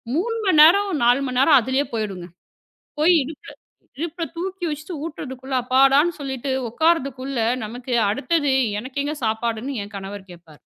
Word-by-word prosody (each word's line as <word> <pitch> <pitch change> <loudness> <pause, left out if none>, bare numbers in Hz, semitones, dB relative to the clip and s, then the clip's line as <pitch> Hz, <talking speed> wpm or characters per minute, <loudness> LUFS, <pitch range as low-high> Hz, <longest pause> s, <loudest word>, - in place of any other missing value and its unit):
3 455 +7 -1
மணி 340 -6 +4
நேரம், 395 +6 +6
4 245 +3 +4
மணி 255 0 -1
நேரம் 280 +2 +6
அதுலயே 260 +4 0
போயிடுங்க. 200 -5 -4 0.8
போய் 335 +4 +5
இடுப்புல, 310 +8 -9 0.5
இடுப்புல 335 +2 -4
தூக்கி 370 0 -4
வச்சி 305 +4 -6
ஊத்துறதுக்குள்ள, 265 -4 -7
அப்பாடான்னு 275 +6 +3
சொல்லிட்டு 265 -1 -4 0.2
உக்காறதுக்குள்ள, 275 -3 0 0.3
நமக்கு 245 +3 -5 0.2
அடுத்தது, 280 +5 0 0.3
"எனக்கு 260 +3 -4
எங்க 300 +2 -3
சாப்பாடுன்னு" 230 +4 -2
என் 205 - -14
கணவர் 195 0 -8
கேப்பாரு. 165 -3 -17
270 Hz, 140 wpm, -22 LUFS, 240-315 Hz, 0.8 s, நேரம்